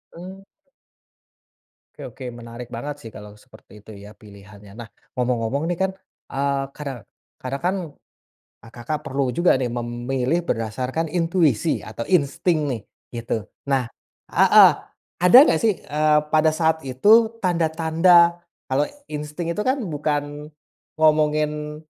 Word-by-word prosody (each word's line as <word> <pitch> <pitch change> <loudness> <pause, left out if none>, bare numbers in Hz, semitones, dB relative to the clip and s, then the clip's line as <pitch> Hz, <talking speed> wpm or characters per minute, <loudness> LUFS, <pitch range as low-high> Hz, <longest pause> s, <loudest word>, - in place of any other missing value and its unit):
Mmm. 185 +3 -10 1.6
Oke - - -11
oke 130 - -10
menarik 120 0 -10
banget 145 +5 -6
sih 115 - -9
kalau 105 -1 -12
seperti 105 0 -18
itu 105 - -19
ya 100 +1 -12
pilihannya. 100 -1 -15
Nah 120 -2 -8 0.3
ngomong-ngomong 125 +3 -1
nih - - -8
kan, 190 0 +1 0.4
eee, 140 0 -1
kare 145 -2 -5 0.5
karena 130 +2 -4
kan, 185 +2 +1 0.9
eee, 115 - -14
Kakak 145 +6 -5
perlu 135 0 -1
juga 175 +1 +4
nih 125 - -1
memilih 120 +5 -2
berdasarkan 125 +8 -2
intuisi 165 - +1
atau 110 +2 -7
insting 170 0 +1
nih 115 - -4 0.4
gitu. 115 -2 -3 0.2
Nah 135 -2 +1 0.5
heeh, - - +7 0.5
ada 180 +6 +6
gak 160 - +2
sih, 215 -4 +2
eee, 150 +1 +2
pada 155 0 +4
saat 160 0 +1
itu 220 - +4
tanda-tanda 170 0 +3 0.2
kalau 140 +3 0 0.2
insting 150 +3 -4
itu 190 - -4
kan 260 +5 +1
bukan 150 -2 -3 0.5
ngomongin 150 -1 +1
150 Hz, 130 wpm, -22 LUFS, 120-165 Hz, 1.6 s, heeh